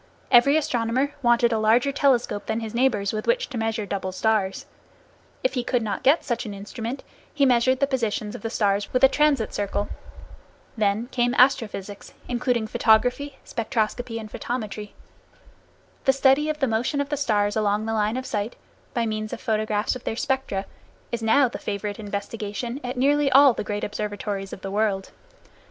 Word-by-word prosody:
Every 275 +4 +6
astronomer 255 -1 0
wanted 240 -1 +3
a 220 - +1
larger 230 +5 +3
telescope 265 -7 +1
than 220 - -1
his 220 -1 -6
neighbors, 235 -5 +1
with 215 - -4
which - - +1
to 260 - -5
measure 225 -1 -1
double 190 -1 -3
stars. 195 -1 0 0.8
If - - +1
he 250 - -1
could 245 -1 0
not 200 -3 -3
get 285 +5 +4
such 240 -3 -1
an 205 -2 -6
instrument, 225 +6 -6 0.3
he 285 -2 +2
measured 255 0 +3
the 280 - +4
positions 225 -6 -2
of 245 - -8
the 225 - -3
stars 205 -2 0
with 255 +1 +1
a - - +11
transit 280 -4 +1
circle. 205 0 -2 0.9
Then 215 +1 +1
came 245 0 +1
astrophysics, 210 -6 +1
including 245 -2 0
photography, 245 +6 +2
spectroscopy 230 0 -2
and 215 -1 -9
photometry. 215 -3 -5 1.1
The 270 - +5
study 275 +3 +3
of 305 - -1
the 285 - +1
motion 235 +6 0
of 285 0 -1
the 295 - 0
stars 210 -7 +1
along 210 0 +1
the 225 - -2
line 215 +2 0
of 260 - -4
sight, 210 0 -3 0.4
by 235 -1 +1
means 215 0 -3
of 240 - -5
photographs 215 -2 0
of 255 - -8
their - - -2
spectra, 255 -6 -1 0.5
is 235 -1 -2
now 240 +5 +4
the 240 - -7
favorite 205 0 -4
investigation 210 +4 -4
at 250 +1 -4
nearly 285 +2 +3
all 275 -1 +7
the - - -4
great 205 0 -4
observatories 205 -1 -4
of - - -8
the 195 - -5
world. 200 -2 0
230 Hz, 175 wpm, -24 LUFS, 210-260 Hz, 1.1 s, a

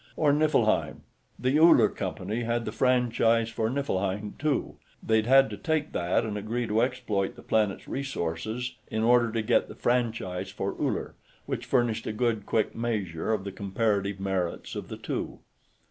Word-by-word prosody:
Or 150 -2 +4
Niflheim. 150 -8 +2 0.3
The 130 +4 +2
Uller 160 -9 +7
Company 100 +3 -4
had 115 0 -1
the 105 - -3
franchise 115 -2 +2
for 110 -1 -1
Niflheim, 105 -6 -2
too; 150 -1 -1 0.3
they'd 110 0 +2
had 135 +1 +6
to 105 - -5
take 155 +6 -1
that 90 +4 0
and 105 -1 -3
agree 120 +4 -2
to 110 +1 +1
exploit 110 -6 -1
the - - -13
planet's 105 -3 0
resources 120 -2 -3 0.2
in 110 0 -1
order 120 0 +4
to 115 0 -1
get 120 +2 +2
the - - -10
franchise 110 -7 -1
for 100 0 -3
Uller, - - -2 0.3
which - - -4
furnished 120 -3 +1
a 110 - -2
good 110 -2 -1
quick 110 - 0
measure 105 -7 -2
of 105 -3 0
the 100 - -5
comparative 100 0 -1
merits 95 -3 -2
of - - -5
the - - -7
two. - - -4
110 Hz, 165 wpm, -27 LUFS, 100-125 Hz, 0.3 s, Uller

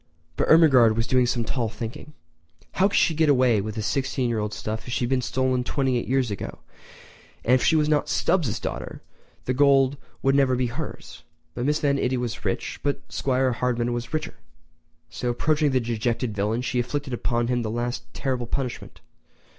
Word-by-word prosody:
But - - 0
Ermengarde 135 -9 +6
was 115 - +1
doing 125 -1 +2
some 120 -1 0
tall 115 0 -2
thinking. 120 +6 -7 0.6
How 190 - +3
could 200 - -1
she 165 - +3
get 160 0 +2
away 125 -6 +4
with 110 +1 -5
the 110 - -3
sixteen 135 0 -1
year 115 -2 0
old 105 0 -2
stuff 110 +2 -5
if 120 - -4
she 120 - 0
had 120 - -4
been 130 -1 +2
stolen 130 0 0
twenty 130 0 0
eight - - -6
years 130 -3 +1
ago? 100 - -5 0.9
And 125 - +4
if 130 - +4
she 160 - +4
was 150 -1 +3
not 150 -1 +1
Stubbs' 165 - +1
daughter - - -6 0.4
the 130 - 0
gold 135 0 +4 0.3
would 135 - +3
never 135 -2 +3
be 125 0 0
hers. 120 - -7 0.3
Mrs. 145 +5 0
Van 140 -1 +2
Itty 130 0 0
was 120 -2 -4
rich, - - -3
but 145 -1 -1
'Squire 130 -1 +1
Hardman 120 0 -1
was 120 -1 -4
richer. 155 0 -3 0.8
So, 125 - -3
approaching 150 +5 +1
the 130 -1 +2
dejected 115 -1 -2
villain, 105 +4 -1
she 125 0 -1
inflicted 135 +2 -3
upon 120 0 0
him 120 0 0
the 110 - -3
last 120 +2 -4
terrible 130 -3 -2
punishment. 130 -1 -5
125 Hz, 195 wpm, -24 LUFS, 120-140 Hz, 0.9 s, Ermengarde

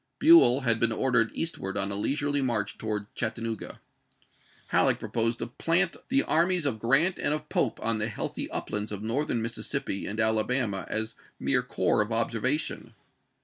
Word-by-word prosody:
Buell 300 - +7
had 115 -3 +3
been 115 0 +3
ordered 115 -1 +2
eastward 100 -12 -3
on 100 0 -1
a - - -1
leisurely 145 +6 0
march 115 -6 -2
towards 105 -2 -3
Chattanooga. 115 -1 -4 0.9
Halleck - - +3
proposed 115 0 -1
to 115 - -3
plant 165 +9 0
the 275 +2 +3
armies 175 0 +2
of 120 -6 -1
Grant 135 - +3
and 150 - +1
of 150 0 -8
Pope 120 - 0
on 115 -1 0
the 105 - 0
healthy 110 - -4
uplands 105 0 -3
of 105 0 -5
Northern 120 0 -1
Mississippi 115 -3 -3
and 105 +2 -4
Alabama 110 -1 0
as 110 +1 -2 0.3
mere 125 -2 +1
corps 125 -3 +1
of 105 +2 -3
observation. 115 +6 -1
115 Hz, 160 wpm, -27 LUFS, 110-140 Hz, 0.9 s, Buell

